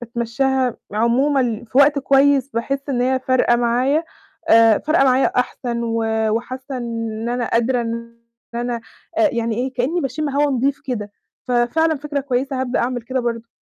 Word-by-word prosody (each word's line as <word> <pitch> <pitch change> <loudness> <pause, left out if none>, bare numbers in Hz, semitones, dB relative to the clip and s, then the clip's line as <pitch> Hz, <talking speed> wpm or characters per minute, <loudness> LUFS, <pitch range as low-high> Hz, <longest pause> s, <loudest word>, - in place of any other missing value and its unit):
باتمشّاها 240 +2 -1 0.2
عمومًا 240 +1 +1
في 250 +4 -1
وقت 280 +1 +5
كويس 275 0 +3
باحس 275 +3 -2
إن 250 -3 0
هي 260 +1 +2
فارقة 255 -2 +2
معايا، 250 +7 +1 0.4
آآ 225 -1 +6
فارقة 310 -2 +2
معايا 260 0 +4
أحسن 245 -1 -1
و 230 -1 -1 0.3
وحاسة 255 +4 -4
إن 230 -2 -4
إن 235 - -3
أنا 240 -1 -2
قادرة 240 +2 +1
إن 235 0 -5 0.4
أنا 240 0 -2 0.4
آآ 325 -2 +5
يعني 230 -2 -1
إيه، 255 +2 -2
كإني 265 +8 -1
باشم 285 +2 -2
هوا 285 +1 +1
نضيف 275 +2 0
كده، 210 -7 -4 0.4
ففعلًا 250 +7 +2
فِكرة 290 0 -3
كويسة 265 0 -2
هابدأ 255 -1 -1
أعمِل 245 0 -2
كده 260 +3 -2
برضه. 235 -1 -3
250 Hz, 165 wpm, -20 LUFS, 235-275 Hz, 0.4 s, آآ